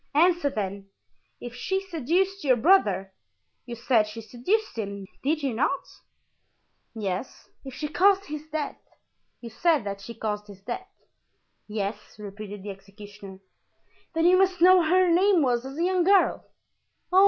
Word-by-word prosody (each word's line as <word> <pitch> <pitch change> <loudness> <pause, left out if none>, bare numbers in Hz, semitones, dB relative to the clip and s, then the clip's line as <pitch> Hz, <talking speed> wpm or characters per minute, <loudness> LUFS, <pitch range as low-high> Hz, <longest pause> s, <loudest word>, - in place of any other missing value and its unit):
"Answer, 340 -1 +4
then. 200 -5 -5 0.5
If 240 -1 -8
she 380 +10 -2
seduced 375 +2 -1
your 260 -3 +4
brother—you 220 - 0
said 230 -2 +2
she 215 +2 -8
seduced 250 - -2
him, 200 -3 -5 0.2
did 300 +2 0
you 270 -3 0
not?" 285 +11 0 1.1
"Yes." 200 +1 -5
"If 265 -2 -9
she 300 - -3
caused 390 +5 +3
his 305 +1 -7
death—you 295 -5 -9
said 320 +2 +2
that 200 -1 -5
she 235 +4 -9
caused 210 -1 -4
his 200 -2 -13
death?" 245 - -5 0.8
"Yes," 210 0 -5
repeated 205 -1 -8
the 205 - -5
executioner. 200 0 -12 0.7
"Then 325 +1 +2
you 365 +1 +6
must 380 -2 +2
know 370 +2 +7
what 335 -3 +2
her 370 +1 +4
name 355 0 +4
was 245 -1 0
as 270 +2 -9
a 335 - 0
young 365 0 +2
girl." 390 +2 +3
255 Hz, 145 wpm, -26 LUFS, -, 1.1 s, know